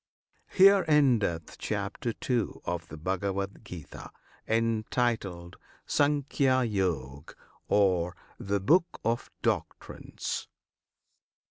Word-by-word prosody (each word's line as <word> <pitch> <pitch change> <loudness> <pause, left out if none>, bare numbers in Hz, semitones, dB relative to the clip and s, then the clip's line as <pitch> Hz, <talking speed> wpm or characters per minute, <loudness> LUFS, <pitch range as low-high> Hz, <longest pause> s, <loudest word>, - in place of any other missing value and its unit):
HERE 195 0 +6
ENDETH 120 - +2
CHAPTER 115 -2 -3
II. 125 -3 +1
OF 85 -2 -3
THE 80 - -9
BHAGAVAD 95 +4 -3
GITA, 90 -7 -9 0.4
Entitled 110 -5 -1 0.3
"Sankhya 140 -2 +2
Yog," 80 - -2 0.3
Or 90 -4 +2 0.2
"The 100 +1 -1
Book 170 - +2
of 115 +1 -1
Doctrines." - - -3
105 Hz, 85 wpm, -29 LUFS, 90-125 Hz, 0.4 s, HERE